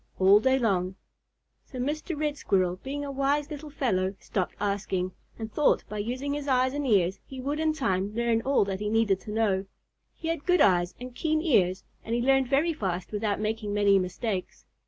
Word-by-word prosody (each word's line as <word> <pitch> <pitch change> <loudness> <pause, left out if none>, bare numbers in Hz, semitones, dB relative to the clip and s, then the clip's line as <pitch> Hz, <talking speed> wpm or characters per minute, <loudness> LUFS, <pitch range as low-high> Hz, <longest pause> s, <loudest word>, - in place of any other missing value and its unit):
all 195 +2 +6
day 260 +3 +3
long. 190 -6 0 0.7
So 260 - -11
Mr. 295 +4 -3
Red 300 -1 0
Squirrel, 185 -9 +1
being 285 +7 -5
a 280 - -4
wise 280 +2 0
little 300 +1 -7
fellow, 195 -9 0
stopped 185 -3 -3
asking, 195 -2 -1 0.3
and 220 -1 -6
thought 300 - +3
by 210 - -4
using 255 +6 -2
his 290 0 -4
eyes 260 -1 +2
and 290 -1 -2
ears 190 -4 +2
he 265 - -10
would 285 +4 -2
in 315 0 +2
time 200 -9 -1
learn 235 -1 +1
all 270 -4 +2
that 195 -1 -3
he 210 0 -2
needed 215 -3 +2
to 210 - -8
know. 205 -3 +1 0.5
He 325 - -5
had 330 -3 -2
good 360 -1 +4
eyes 175 -6 +3
and 250 0 -8
keen 310 +4 0
ears, 190 - +2 0.2
and 230 - -2
he 240 - 0
learned 270 0 +3
very 290 +6 +2
fast 185 - -3
without 210 -1 -1
making 215 -1 -2
many 200 -1 +4
mistakes. 185 +1 -4
225 Hz, 200 wpm, -27 LUFS, 195-280 Hz, 0.7 s, all